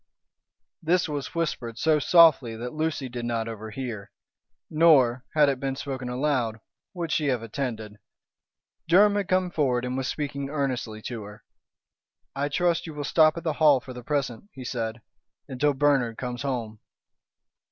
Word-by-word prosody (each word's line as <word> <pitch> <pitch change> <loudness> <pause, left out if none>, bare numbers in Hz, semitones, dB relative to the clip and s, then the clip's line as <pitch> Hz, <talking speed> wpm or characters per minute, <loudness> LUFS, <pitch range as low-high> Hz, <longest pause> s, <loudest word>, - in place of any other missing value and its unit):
This 175 +2 +2
was 145 +1 -5
whispered 125 -9 -2
so 155 +2 +3
softly 150 -8 +5
that 120 +2 -6
Lucy 155 -3 -2
did 120 -1 -6
not 115 -1 -2
overhear. 110 -1 -6 0.6
Nor, 135 -7 +4
had 150 -1 +5
it 135 -2 0
been 135 -1 -2
spoken 130 -2 -5
aloud, 125 -4 -1 0.4
would 170 -2 -3
she 150 - +1
have 125 -4 0
attended. 110 -3 -5 0.9
Durham 200 +5 +6
had 205 -2 -1
come 185 -1 +1
forward 125 -6 0
and 125 0 -3
was 130 -1 -2
speaking 140 -2 -3
earnestly 130 -7 -3
to 120 -3 -5
her. 105 +1 -11 0.9
"I 140 +1 -1
trust 170 +3 0
you 160 - -8
will 145 - -4
stop 155 +2 +4
at 170 - -5
the 160 -3 0
Hall 145 -4 +6
for 130 0 -10
the 125 - -8
present," 140 - -3
he 130 -2 -9
said, 115 -2 -4 0.4
"until 140 +2 0
Bernard 135 -5 +2
comes 125 -1 -5
home." 120 -6 -3
135 Hz, 160 wpm, -26 LUFS, 120-155 Hz, 0.9 s, Durham